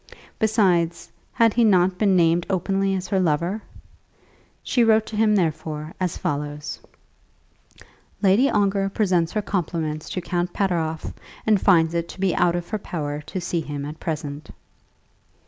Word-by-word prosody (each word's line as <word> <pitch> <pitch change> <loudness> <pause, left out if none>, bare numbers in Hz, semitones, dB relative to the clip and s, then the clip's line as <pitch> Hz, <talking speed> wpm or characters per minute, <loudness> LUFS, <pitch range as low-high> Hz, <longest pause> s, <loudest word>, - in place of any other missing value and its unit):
Besides, 185 -6 +1 0.2
had 230 -2 +3
he 240 - +3
not 185 -3 +3
been 200 -3 +3
named 170 0 +3
openly 195 +1 0
as 185 -1 -4
her 195 - +1
lover? 175 +5 0 1.0
She 245 - +2
wrote 220 -1 +4
to 220 - -7
him, 215 0 +3
therefore, 155 -3 -2
as 180 -2 -1
follows: 145 +1 -4 1.4
"Lady 210 +7 +4
Ongar 195 -1 +1
presents 180 -5 +1
her 215 - -1
compliments 160 -5 -3
to - - -3
Count 175 0 -2
Pateroff, 165 -5 -1 0.3
and 215 -3 +3
finds 165 -4 +4
it 170 0 -2
to - - -10
be 190 -2 +1
out 175 -1 +2
of 175 -1 -4
her 215 - -2
power 150 -6 -4
to 190 - -4
see 175 -1 -2
him 145 -2 -5
at 150 +2 -8
present." 150 -2 -5
180 Hz, 150 wpm, -23 LUFS, 160-200 Hz, 1.4 s, wrote